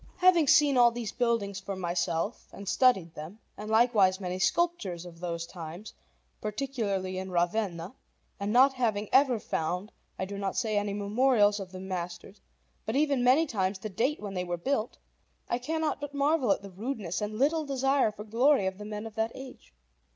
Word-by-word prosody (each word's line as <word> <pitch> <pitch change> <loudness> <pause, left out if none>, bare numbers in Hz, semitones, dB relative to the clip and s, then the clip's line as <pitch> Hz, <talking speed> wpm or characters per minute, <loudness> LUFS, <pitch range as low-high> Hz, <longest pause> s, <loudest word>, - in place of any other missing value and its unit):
Having 360 -4 +5
seen 285 -1 +5
all 240 -1 +7
these 235 -3 -5
buildings 230 -5 0
for 195 0 -5
myself 175 -2 -2
and 200 - -10
studied 195 -9 +3
them, 155 +7 -9 0.2
and 210 +1 -7
likewise 220 -5 +4
many 185 -1 -4
sculptures 195 - 0
of 170 -1 -11
those 170 -1 -3
times, 170 +4 -9 0.5
particularly 210 -5 -2
in 190 0 -5
Ravenna, 175 +1 -1 0.5
and 200 +1 -2
not 260 +4 +6
having 220 -5 -1
ever 265 -4 +5
found, 180 +4 -3 0.3
I 190 - -2
do 200 +1 -6
not 195 -1 -3
say 220 -3 0
any 205 -1 0
memorials 210 0 +3
of 190 -2 -7
the 185 - -8
masters, 185 +1 -6 0.4
but 220 - -3
even 280 -3 +2
many 260 +6 +5
times 195 -7 -1
the 215 +3 -6
date 250 - 0
when 205 -2 -6
they 180 -1 -2
were 175 -1 -3
built, 230 +4 -2 0.5
I 240 - -1
cannot 315 +3 -2
but 290 0 -6
marvel 280 -4 +2
at - - 0
the 200 - -9
rudeness 200 -4 -4
and 210 +1 -3
little 305 +5 +2
desire 270 -3 +2
for 210 0 -9
glory 235 +2 +3
of 190 +1 -3
the 210 - -7
men 210 +1 -5
of 225 - -8
that 220 +1 -1
age. 265 - -11
210 Hz, 185 wpm, -29 LUFS, 185-255 Hz, 0.5 s, all